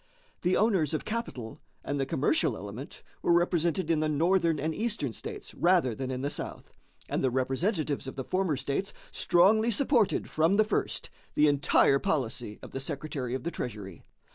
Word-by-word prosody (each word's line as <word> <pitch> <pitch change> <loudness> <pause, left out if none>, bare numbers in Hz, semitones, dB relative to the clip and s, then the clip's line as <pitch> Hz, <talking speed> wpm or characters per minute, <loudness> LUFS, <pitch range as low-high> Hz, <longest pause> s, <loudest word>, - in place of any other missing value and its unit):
The 180 +1 +2
owners 185 -9 +2
of - - -4
capital 135 - -5 0.2
and 145 0 -2
the 135 - 0
commercial 155 - +1
element - - -8 0.2
were - - +3
represented 170 0 +2
in 160 - +2
the 155 0 +1
Northern 165 +1 +2
and 160 +3 -1
Eastern 210 - -2
States - - -7
rather 175 -8 +3
than 130 +3 -4
in 130 0 -3
the 145 - -1
South, - - -6 0.3
and - - -1
the 130 - +3
representatives 140 - -1
of 130 - -6
the 135 - -4
former 185 -2 0
states 140 +9 -2 0.2
strongly 215 +6 +4
supported 240 -2 +2
from 160 +5 +2
the 215 +1 +4
first 215 - -2 0.2
the 150 - +5
entire 145 -1 +4
policy 125 - -2
of - - -9
the 135 - -4
Secretary 135 -2 -3
of 130 - -5
the 170 - -2
Treasury. 100 - -6
155 Hz, 175 wpm, -29 LUFS, 135-185 Hz, 0.3 s, the